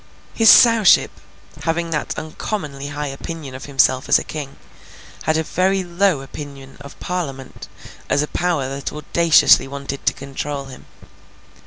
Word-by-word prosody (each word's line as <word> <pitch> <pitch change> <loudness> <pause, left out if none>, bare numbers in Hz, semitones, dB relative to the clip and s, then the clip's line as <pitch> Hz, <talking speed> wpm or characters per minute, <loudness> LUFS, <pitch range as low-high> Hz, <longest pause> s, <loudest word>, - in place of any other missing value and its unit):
His 225 -1 +5
Sowship, 230 -5 +6 0.5
having 165 +1 -2
that 155 - -3
uncommonly 150 -4 -5
high 145 +1 -5
opinion 140 0 -7
of 130 - -8
himself 130 -2 +1
as - - +6
a - - -4
king, 145 -3 -7 0.7
had 155 0 +2
a 160 - 0
very 190 +4 0
low 175 -3 +1
opinion 135 -1 -10
of 140 0 -12
Parliament 145 -7 -5 0.4
as 145 - +2
a - - -4
power 170 -7 -1
that 135 +1 -5
audaciously 160 0 +4
wanted 140 0 -6
to - - +4
control 140 +1 -6
him. 135 -1 -13
150 Hz, 145 wpm, -20 LUFS, 135-170 Hz, 0.7 s, Sowship